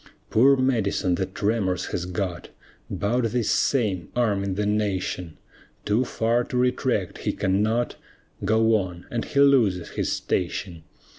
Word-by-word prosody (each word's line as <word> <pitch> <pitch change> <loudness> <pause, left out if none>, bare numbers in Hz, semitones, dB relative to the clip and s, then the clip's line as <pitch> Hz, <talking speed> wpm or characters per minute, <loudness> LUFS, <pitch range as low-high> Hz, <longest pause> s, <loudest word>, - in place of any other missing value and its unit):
Poor 135 +5 +6
Madison 110 -7 +1
the 95 +1 -1
tremors 100 -1 -1
has 90 0 -2
got, 90 -1 -4 0.4
'Bout 120 +5 0
this 115 0 0
same 100 - +1
arming 100 -5 0
the 105 +1 -1
nation; 95 -5 -2 0.5
Too 110 +5 +2
far 115 +1 +1
to 125 - -3
retract, 125 -5 0
he - - -1
cannot 110 +5 0 0.5
Go 110 +1 +3
on 90 -3 -5
and 120 -1 -1
he 140 - -1
loses 115 -11 +3
his - - -2
station. 90 -1 -2
105 Hz, 135 wpm, -24 LUFS, 95-120 Hz, 0.5 s, Poor